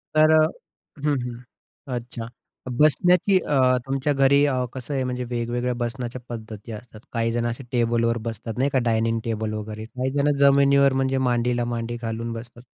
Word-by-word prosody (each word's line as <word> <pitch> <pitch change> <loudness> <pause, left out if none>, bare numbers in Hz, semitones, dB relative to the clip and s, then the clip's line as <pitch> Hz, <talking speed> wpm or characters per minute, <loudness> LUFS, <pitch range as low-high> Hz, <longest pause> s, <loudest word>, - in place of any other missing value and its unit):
तर 155 0 +6
अ, 155 0 +6 0.6
हं, 150 -1 +2
हं 125 +2 -11
अच्छा 120 -1 -6 0.5
बसण्याची 180 +5 +4
अ, 130 -5 +3
तुमच्या 135 +2 0
घरी 140 +1 +4
अ, 140 -2 +1 0.2
कसं 130 +2 -5
आहे 135 -1 0
म्हणजे 125 0 -3
वेगवेगळ्या 120 +1 -1
बसण्याच्या 120 +1 -4
पद्धती 110 -2 -8
असतात. 110 0 -10
काहीजण 115 0 0
असे 120 +3 -3
टेबलवर 115 -1 +1
बसतात 115 0 -5
नाही 135 +3 +2
का 130 - +4
डायनिंग 115 0 +1
टेबल 110 -2 -2
वगैरे, 110 0 -6
काही 130 +3 -3
जणं 145 +1 +2
जमिनीवर 140 0 +5
म्हणजे 135 0 +1
मांडीला 120 0 +1
मांडी 120 0 -3
घालून 115 0 -3
बसतात. 120 +1 -9
120 Hz, 160 wpm, -24 LUFS, 115-135 Hz, 0.6 s, तर